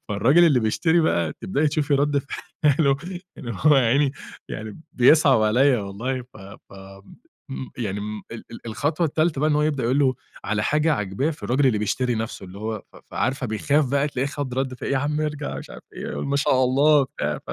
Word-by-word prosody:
فالراجل 125 +12 +4
اللي 145 -7 +4
بيشتري 160 +10 +2
بقى 85 - +1
تبدئي 145 +10 0
تشوفي 150 -1 0
رد 145 +1 +2
فعله 140 -1 0 0.4
إن 130 - -8
هو 140 +7 +3
يا 135 - +4
عيني 135 +3 +2 0.4
يعني 110 +4 -7
بيصعب 135 -2 +5
عليَّ 125 +5 +4
والله، 115 +6 -4
ف 125 - -19 0.3
ف - - -18 0.8
إمم 130 -1 -6
يعني 105 -3 -3
م 105 0 -6
ال 115 - -8
ال 115 - -11
الخطوة 145 - -1
التالتة 155 -1 0
بقى 155 +1 +2
إن - - +2
هو 150 - +2
يبدأ 150 -4 0
يقُول 125 +4 +1
له 135 -3 +3 0.3
على 105 0 -1
حاجة 150 +6 +2
عاجباه 105 +5 -1
في 155 - -10
الراجل 135 +3 +1
اللي 110 -5 +2
بيشتري 120 +4 -1
نَفسه، 110 -2 -5
اللي 95 +1 -11
هو 110 +1 -3
ف - - -16
ف - - -14
فعارفة 130 0 -1
بيخاف 140 +6 +1
بقى، 140 +1 +1
تلاقيه 135 -1 -2
خد 140 -3 -4
رد 130 -1 -2
فعل - - -6
يا 135 - +2
عم 150 +2 -1
ارجع 150 -1 -3
مش - - -10
عارف - - -11
إيه، - - -6
قُل 70 - -4
ما 140 - 0
شاء 130 -2 +3
الله 145 +4 +4
وبتاع، 75 - -3
135 Hz, 210 wpm, -23 LUFS, 110-145 Hz, 0.8 s, بيصعب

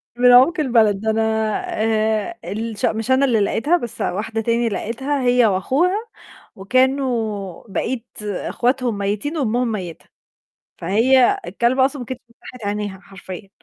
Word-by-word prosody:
من 245 0 +5
عُمق 270 +8 +6
البلد، 225 -8 +3
ده 220 - -1
أنا 220 +1 +1 0.6
آآ، 220 +8 0
الش 220 +1 -3
مش 225 +3 -1
أنا 260 +2 +4
اللي 235 -5 +2
لقيتها 285 - +2
بس 235 -8 -6
واحدة 220 +4 -2
تانية 230 +1 +1
لقيتها 265 +7 -2
هي 245 -1 +4
وأخوها، 265 - +1 0.6
وكانوا 225 -4 0
بقيت 235 +4 -3 0.2
أخواتهم 240 +3 -1
ميّتين 205 +11 -2
وأمهم 245 -2 0
ميّتة، 180 -6 -6 0.7
فهي 240 +8 +3
الكلبة 240 +8 +2
أصلًا 275 +1 -1
ما 245 - -6
كانتش 255 -1 -7
فتَّحت 235 -1 -11
عينيها 205 -2 -3
حرفيًا. 195 0 -10
230 Hz, 135 wpm, -20 LUFS, 210-260 Hz, 0.7 s, عُمق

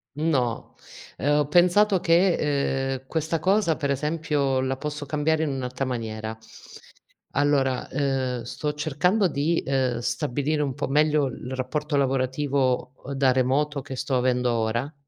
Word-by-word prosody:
No, 135 -7 -1 0.4
ehm, 145 +2 +2
ho 145 - +1
pensato 180 +5 +4
che, 175 +2 +4 0.6
ehm: 130 0 -7
"Questa 160 +1 -1
cosa," 190 -1 +2
per 140 -3 -2
esempio, 145 -2 0
"la 130 0 -1
posso 150 0 -5
cambiare 155 +2 +1
in 160 - 0
un'alta 130 -1 -3
maniera." 110 -3 -4 0.9
Allora, 140 -2 +1
ehm, 130 -4 -1
sto 145 +5 -3
cercando 180 +7 +1
di, 155 +2 0
ehm, 130 -3 0
stabilire 135 +6 -1
un 140 -3 -2
po' 145 - -2
meglio 150 +1 +3
il 130 0 -6
rapporto 150 +4 -2
lavorativo, 130 -1 0
uhm, 140 - -5
da 135 -1 +3
remoto 135 +3 +1
che 130 - -7
sto 135 +1 -2
avendo 125 -1 +1
ora. 115 +5 -1
140 Hz, 145 wpm, -25 LUFS, 130-150 Hz, 0.9 s, pensato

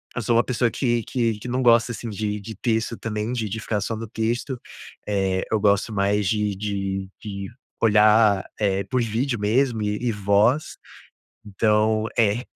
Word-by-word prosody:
eu 125 - -2
sou 115 +1 +1
uma 120 - +5
pessoa 125 -1 0
que 120 -2 0
que 115 -4 -1
que 115 - -8
não 125 +1 -1
gosta, 120 0 +4
assim, 115 - -6
de 105 0 -3
de 110 +3 -7
texto 115 +1 -1
também 110 +1 -3
de 115 -3 -2
de 110 +3 -4
ficar 105 0 -1
só 110 +3 -3
no 115 +1 -6
texto, 120 +4 -2 0.5
eh, 95 -2 0
eu 110 - +2
gosto 100 +1 +2
mais 100 0 +1
de 105 +1 0
de 95 -1 -3
de 100 -2 -6 0.4
olhar, 105 -2 +5
é 100 -2 +1
por 125 -1 0
vídeo 120 +2 -1
mesmo 115 +2 +1
e 105 0 -1
e - - +2
voz, 105 +7 +1 0.7
então 110 +1 +1
é. 115 +2 +2
110 Hz, 175 wpm, -23 LUFS, 105-115 Hz, 0.7 s, uma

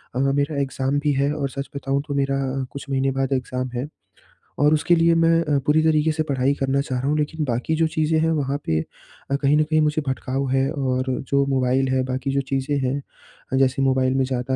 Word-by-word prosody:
अ, - - 0
मेरा 140 +2 +1
एग्ज़ाम 135 +1 -1
भी 145 0 +1
है, 140 +1 +1
और 145 -2 -2
सच 140 +1 -6
बताऊँ 140 0 -1
तो 145 - -3
मेरा 135 0 +1 0.4
कुछ 140 0 -9
महीने 135 0 +1
बाद 135 0 -1
एग्ज़ाम 130 -1 -2
है, 125 +4 -2 0.7
और 150 +2 +4
उसके 165 +3 +3
लिए 165 0 +4
मैं 165 0 +4
अ, 150 -3 +1
पूरी 155 +2 +3
तरीक़े 155 0 +3
से 155 0 -1
पढ़ाई 140 -2 +1
करना 135 0 +1
चाह 130 -3 -3
रहा 130 - -2
हूँ, 150 - +1
लेकिन 155 +1 -2
बाकी 125 +5 -1
जो 165 0 +2
चीज़ें 160 0 +1
हैं 160 +1 +2
वहाँ 140 -3 0
पे 80 -1 +1 0.5
अ, - - +3
कहीं 140 +1 +2
न 155 - +4
कहीं 155 +1 +1
मुझे 150 0 +1
भटकाव 135 +1 -2
है, 135 +1 +1
और 130 -4 -1 0.2
जो 140 0 +3
मोबाइल 135 -1 +1
है, 130 0 +1
बाकी 130 +1 -2
जो 140 0 +1
चीज़ें 135 +2 0
हैं 130 0 0 0.6
अ, - - +3
जैसे 135 0 +2
मोबाइल 130 -1 +2
में 135 - +2
ज़्यादा 130 0 -2
140 Hz, 225 wpm, -22 LUFS, 130-150 Hz, 0.7 s, और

